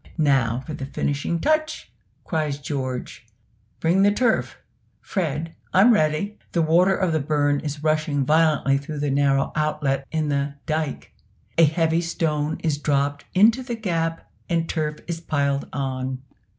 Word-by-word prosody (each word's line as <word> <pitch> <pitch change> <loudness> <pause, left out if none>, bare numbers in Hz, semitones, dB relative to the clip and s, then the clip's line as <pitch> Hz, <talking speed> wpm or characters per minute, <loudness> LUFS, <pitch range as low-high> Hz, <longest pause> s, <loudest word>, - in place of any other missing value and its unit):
"Now 130 -6 +2
for 155 - -6
the 135 -2 -5
finishing 145 +4 -2
touch!" 310 - 0 0.3
cries 155 -4 -1
George; 130 -5 -5 0.5
"bring 175 +4 +2
the 205 +1 +5
turf; 230 +2 +1 0.4
Fred 165 -3 -3 0.2
I'm 215 +6 +7
ready!" 155 +3 0
The 170 - +2
water 175 +4 +4
of 185 -4 0
the 155 - +2
burn 145 0 +1
is 150 0 -5
rushing 155 -3 +1
violently 155 -2 +3
through 150 +2 -7
the 145 -1 -1
narrow 140 0 +2
outlet 150 -3 0
in 155 -2 -1
the 140 0 -1
"dike." 155 -2 -3 0.5
A 165 - +8
heavy 160 +2 +1
stone 155 -3 -1
is 155 -3 0
dropped 145 -1 0
into 220 +6 +5
the 245 -2 -4
gap, 165 -6 -2 0.2
and 165 -1 0
turf 150 -2 -2
is 170 -1 -4
piled 140 -3 -1
on. 130 -1 -3
155 Hz, 150 wpm, -23 LUFS, 140-165 Hz, 0.5 s, A